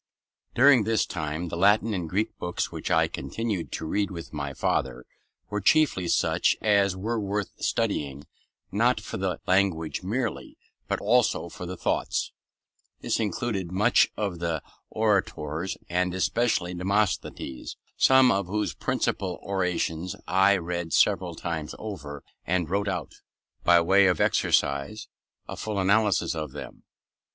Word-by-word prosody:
During 130 -2 +6
this 110 +1 +1
time, 80 +1 -4
the - - -4
Latin 105 +5 +3
and 90 -4 -3
Greek 105 +6 -1
books 90 0 -2
which - - -5
I - - +3
continued 110 -7 -4
to - - -4
read 100 +5 0
with 85 -4 -8
my 70 -2 -3
father 65 - -1 0.5
were 105 0 -1
chiefly 95 - +3
such - - +2
as 100 -3 +3
were 115 +4 -2
worth 100 -1 -2
studying, 70 -1 -1 0.5
not 115 +4 +2
for 105 - -6
the 95 -2 -2
language 90 -4 +1
merely, 115 +5 -3 0.3
but - - -1
also - - +2
for 90 - -8
the 90 +1 -6
thoughts. - - -1 0.7
This - - 0
included 100 -3 -2
much 105 +6 +4
of 100 -5 -2
the 85 -3 -2 0.3
orators, 95 -6 -1
and 90 +1 0
especially 95 -2 0
Demosthenes, 95 -7 -2 0.2
some 130 -1 +6
of 100 -2 0
whose 105 +3 -1
principal 90 -2 -2
orations 90 -3 -1
I 95 +2 +4
read 85 -1 -4
several - - +2
times 80 -3 -4
over, 75 -10 -7 0.2
and 90 -2 0
wrote 100 +1 0
out, 90 -4 -3 0.5
by 85 0 +6
way 95 +3 +5
of 90 - +1
exercise, 70 +10 +1 0.4
a - - -6
full 105 -2 -4
analysis 100 0 +2
of 75 -4 -5
them. 75 - -9
95 Hz, 140 wpm, -26 LUFS, 85-105 Hz, 0.7 s, During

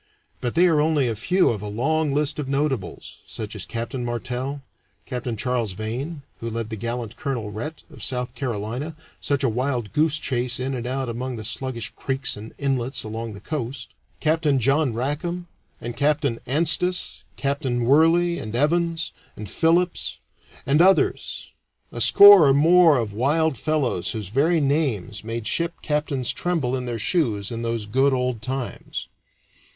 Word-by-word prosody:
But 120 -2 -3
they 175 +2 +5
are 160 -4 +4
only 150 -4 +2
a 115 - -1
few 180 - +2
of 105 -4 -4
a 105 - -5
long 145 +8 0
list 150 +1 0
of 140 -3 -3
notables, 140 -5 -2
such 110 0 -5
as 100 - -5
Captain 120 +2 -4
Martel, 125 +3 -3 0.4
Capt. 125 -3 -4
Charles 120 -3 -1
Vane 130 - -5 0.2
(who 115 - -4
led 115 0 -4
the - - -2
gallant 115 +1 -4
Colonel 120 -8 -3
Rhett, 150 +10 -6
of 145 -8 -14
South 125 +1 -2
Carolina, 125 +4 -4 0.2
such 140 -1 0
a - - +4
wild 120 -2 -1
goose 150 0 +3
chase 125 -3 -1
in 130 +1 -2
and 125 -1 -4
out 130 +1 -2
among 125 +2 -4
the 110 - -6
sluggish 120 0 -2
creeks 135 0 -1
and 105 +2 -10
inlets 135 -2 -1
along 110 +1 -5
the 100 - -9
coast), 130 -2 -5 0.3
Capt. 160 +1 +1
John 140 +3 +2
Rackam, 145 +9 -3 0.3
and 120 +1 -6
Captain 145 -4 +1
Anstis, 170 +6 0 0.2
Captain 135 -4 -1
Worley, 165 +5 +4
and 110 +1 -6
Evans, 165 +4 +1 0.3
and 105 - -6
Philips, 170 - +1 0.5
and 145 +4 +4
others 190 +2 +2 0.4
a - - -5
score 200 -6 +9
or 135 - +5
more 165 +1 +6
of 110 -4 -2
wild 145 +7 +1
fellows 140 - -1
whose 105 -5 -5
very 155 - +2
names 135 - 0
made 115 0 -4
ship 170 +5 0
captains 150 -4 -1
tremble 160 -8 -1
in 125 -1 -4
their 120 -1 -2
shoes 110 - +1
in 115 0 -4
those 115 -2 -2
good 135 +6 +2
old 125 -3 -1
times. 130 +1 -5
130 Hz, 165 wpm, -23 LUFS, 115-150 Hz, 0.5 s, score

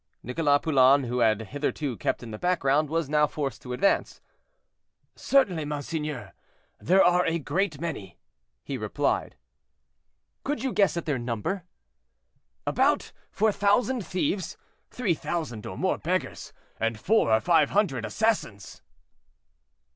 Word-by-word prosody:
Nicholas 145 +3 +2
Poulain, 140 -2 +5
who 125 0 -2
had 110 -2 +3
hitherto 145 -1 -2
kept - - -2
in 115 - -8
the 105 - -7
background, 155 -4 +1
was 165 -1 -1
now 150 +1 +3
forced 140 -6 -4
to 125 - -8
advance. 160 +11 +1 1.0
"Certainly, 190 - +2
monseigneur, 145 - -4 0.5
there 190 +3 +4
are 180 0 +4
a 165 0 +1
great 160 +1 -1
many," 120 - -5 0.5
he - - -5
replied. - - -1 1.1
"Could 275 -4 -2
you 265 - -1
guess 195 -4 +2
at 170 - -3
their 145 -5 -1
number?" 120 - -3 1.0
"About - - +1 0.2
four 220 +1 +2
thousand 215 +4 +1
thieves, 185 +1 -2 0.3
three 225 -8 0
thousand 155 -10 -4
or - - -7
more - - 0
beggars, - - -3 0.3
and 115 -1 -1
four 215 - +2
or 110 - +5
five 160 +2 +3
hundred 175 - +1
assassins." 110 - -2
150 Hz, 130 wpm, -26 LUFS, 125-185 Hz, 1.1 s, Poulain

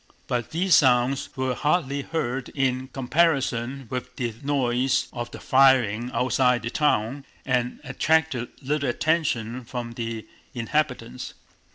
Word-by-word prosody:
But 120 -2 -2
these 180 +3 +1
sounds 130 0 +4
were 130 -1 0
hardly 145 0 0
heard 135 -4 -3
in 130 -2 0
comparison 135 -2 0
with 125 0 -5
the 120 -5 -2
noise 130 -2 +1
of 120 -1 -4
the - - -9
firing 125 -4 +4
outside 125 -1 +2
the 115 - -3
town 135 -2 +1 0.2
and 125 -1 0
attracted 160 -6 +1
little 140 0 0
attention 130 -5 0
from 120 0 -5
the 115 -1 -5 0.3
inhabitants. 125 -1 -2
130 Hz, 125 wpm, -25 LUFS, 120-140 Hz, 0.3 s, sounds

